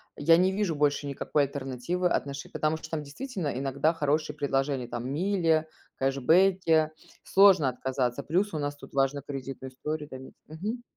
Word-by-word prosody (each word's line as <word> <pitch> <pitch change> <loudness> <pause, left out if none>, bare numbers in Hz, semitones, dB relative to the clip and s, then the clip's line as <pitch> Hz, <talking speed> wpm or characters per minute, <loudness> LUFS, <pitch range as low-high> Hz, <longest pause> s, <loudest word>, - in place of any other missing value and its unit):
я 165 +3 +5
не 185 +1 +3
вижу 190 -5 -1
больше 145 0 +1
никакой 140 +1 0
альтернативы 140 +6 -2
отношений 140 -3 -3
Потому 155 +1 0
что 160 0 -11
там 155 -2 -2
действительно 185 - -5
иногда 140 +4 +1
хорошие 150 0 0
предложения, 135 -3 -1
там 120 +1 -5
мили, 165 -2 +1 0.3
кэшбэки, 160 +4 +3 0.3
сложно 190 -8 +5
отказаться, 130 0 -2
плюс 185 +7 0
у 155 - -2
нас 145 0 -2
тут - - -13
важно 135 0 +1
кредитную 135 -2 -6
историю 150 +3 -4
там 130 0 -9
ить - - -17
Мгм. 210 +10 -5
150 Hz, 160 wpm, -28 LUFS, 135-165 Hz, 0.3 s, я